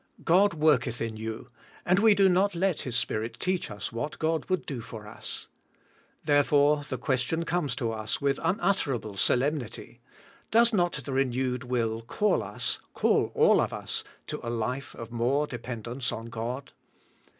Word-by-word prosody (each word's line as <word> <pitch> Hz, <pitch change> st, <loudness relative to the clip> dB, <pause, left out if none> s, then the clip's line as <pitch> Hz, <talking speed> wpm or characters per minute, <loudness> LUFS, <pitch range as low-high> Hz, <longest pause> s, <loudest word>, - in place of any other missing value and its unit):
God 190 Hz, +2 st, +4 dB
worketh 130 Hz, -6 st, +2 dB
in 115 Hz, -1 st, -3 dB
you, 110 Hz, +3 st, -6 dB, 0.3 s
and 185 Hz, +2 st, +4 dB
we 215 Hz, 0 st, +6 dB
do 195 Hz, -1 st, +5 dB
not 190 Hz, +1 st, +3 dB
let 185 Hz, -1 st, +1 dB
His 125 Hz, -3 st, -3 dB
Spirit 115 Hz, -1 st, -1 dB
teach 185 Hz, 0 st, -1 dB
us 105 Hz, -1 st, -5 dB
what 145 Hz, +6 st, -4 dB
God 160 Hz, -1 st, 0 dB
would 185 Hz, -1 st, 0 dB
do 135 Hz, -6 st, -4 dB
for 110 Hz, -2 st, -9 dB
us. -, -, -6 dB, 0.8 s
Therefore, 145 Hz, 0 st, +4 dB
the 130 Hz, -, -2 dB
question 135 Hz, +5 st, 0 dB
comes 165 Hz, -8 st, 0 dB
to 120 Hz, -4 st, -1 dB
us 110 Hz, -1 st, -3 dB
with 140 Hz, -2 st, +1 dB
unutterable 165 Hz, -, 0 dB
solemnity. 130 Hz, +4 st, -1 dB, 0.5 s
Does 235 Hz, +1 st, +5 dB
not 175 Hz, -4 st, +2 dB
the 140 Hz, -, -4 dB
renewed 130 Hz, -1 st, 0 dB
will 115 Hz, -2 st, -1 dB
call 200 Hz, -, +1 dB
us, -, -, -3 dB, 0.2 s
call -, -, +2 dB
all -, -, +5 dB
of -, -, -1 dB
us, -, -, -3 dB, 0.2 s
to -, -, -5 dB
a 115 Hz, -, -4 dB
life 120 Hz, +3 st, -3 dB
of 115 Hz, 0 st, -8 dB
more 125 Hz, +5 st, +1 dB
dependence 120 Hz, 0 st, -4 dB
on 115 Hz, +1 st, -6 dB
God? 120 Hz, +4 st, -4 dB
135 Hz, 160 wpm, -28 LUFS, 115-165 Hz, 0.8 s, we